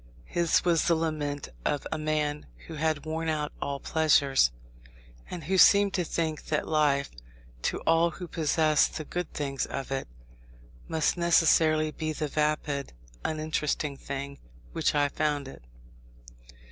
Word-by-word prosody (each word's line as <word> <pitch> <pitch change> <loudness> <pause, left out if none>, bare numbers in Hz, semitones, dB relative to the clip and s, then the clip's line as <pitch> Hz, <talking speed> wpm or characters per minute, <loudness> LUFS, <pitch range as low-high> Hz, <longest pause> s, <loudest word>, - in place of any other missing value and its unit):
His 170 0 +1
was 170 -2 +3
the 170 - +4
lament 150 -3 -2
of 145 - -1
a 155 - -2
man 150 -1 -1 0.2
who 165 - -9
had 155 -1 -1
worn 160 +1 -2
out 150 -1 -1
all 140 0 -2
pleasures, 140 - +3 0.8
and 175 -3 -6
who 185 +5 +1
seemed 200 0 +6
to 180 - +1
think 160 -2 -2
that 155 -1 -1
life, 145 -3 +2 0.5
to - - -1
all 165 +1 +3
who 180 +1 -8
possess 155 -1 +2
the 155 - -7
good 175 +3 -4
things 140 -2 -3
of 135 -1 -5
it, 135 0 -2 0.8
must 160 +2 0
necessarily 160 -2 +4
be 155 0 -3
the 150 0 -2
vapid, 150 - -1 0.3
uninteresting 155 -2 -1
thing 140 0 -6 0.3
which - - 0
I 145 -1 +3
found 145 -1 -1
it. 135 - -11
155 Hz, 145 wpm, -28 LUFS, 145-160 Hz, 0.8 s, seemed